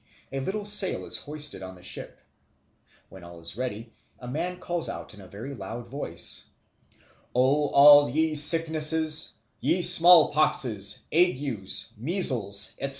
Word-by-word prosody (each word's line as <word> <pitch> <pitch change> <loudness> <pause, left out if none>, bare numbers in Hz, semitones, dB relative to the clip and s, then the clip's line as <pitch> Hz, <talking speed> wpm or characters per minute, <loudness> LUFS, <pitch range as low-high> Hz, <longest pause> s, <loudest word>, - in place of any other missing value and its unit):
A 135 - -5
little 200 +9 -6
sail 205 -2 +2
is - - -2
hoisted 150 -7 -6
on 95 0 -10
the 90 - -18
ship. - - -4 0.9
When 95 -2 -15
all 85 0 -14
is 85 +2 -6
ready, 115 -2 -7 0.3
a 125 - -13
man 170 +8 -5
calls 175 -2 -4
out - - -9
in 105 - -15
a 95 - -15
very 115 +9 -10
loud 115 +1 -9
voice, 140 +4 -3 0.9
"O 140 +4 0
all 145 +1 +5
ye 160 +4 -2
sicknesses, 155 0 +3 0.3
ye 170 +7 -1
smallpoxes, 150 - +4
agues, 140 - -1
measles, 120 - 0
etc. 140 - -5
140 Hz, 140 wpm, -24 LUFS, 110-160 Hz, 0.9 s, all